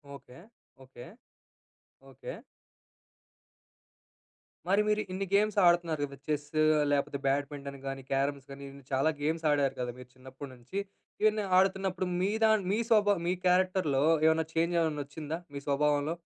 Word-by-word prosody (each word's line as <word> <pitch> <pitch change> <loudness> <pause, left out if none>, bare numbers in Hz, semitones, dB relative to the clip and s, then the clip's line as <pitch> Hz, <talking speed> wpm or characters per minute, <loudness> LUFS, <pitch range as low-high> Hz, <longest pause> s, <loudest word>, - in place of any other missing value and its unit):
Okay. 130 -2 -14 0.4
Okay. 125 -2 -12 1.0
Okay. - - -8 2.3
మరి 195 +3 +3
మీరు 210 0 +2
ఇన్ని 195 +1 -3
గేమ్స్ 210 +1 +2
ఆడుతున్నారు 170 -3 +3
కదా, 140 -1 -11
చెస్ 150 -1 -2 0.4
లేకపోతే 140 0 0
బ్యాడ్మింటన్ 140 0 -2
కానీ, 135 0 -4
క్యారమ్స్ 140 0 -1
కానీ, 140 0 -9
ఇన్ని 140 -1 -14
చాలా 135 +4 +3
గేమ్స్ 160 +2 -1
ఆడారు 140 -2 +1
కదా, 125 -1 -2
మీరు 125 0 -12
చిన్నప్పుటి 130 +2 -10
నుంచి. 125 +11 -6 0.4
ఇవన్నీ 215 0 +2
ఆడుతున్నప్పుడు 190 0 +1
మీ 190 +2 +1
దా 220 - +6 0.2
మీ 215 - +1
స్వభావం 205 -5 +3
మీ 180 - +2
క్యారెక్టర్‌లో 180 -6 +2 0.2
ఏమైనా 160 0 +3
చేంజ్ 165 +1 +1
ఏమైనా 155 -3 0
వచ్చిందా 150 +2 -6 0.2
మీ 140 - -4
స్వభావంలో? 145 +2 +1
150 Hz, 135 wpm, -30 LUFS, 140-185 Hz, 2.3 s, దా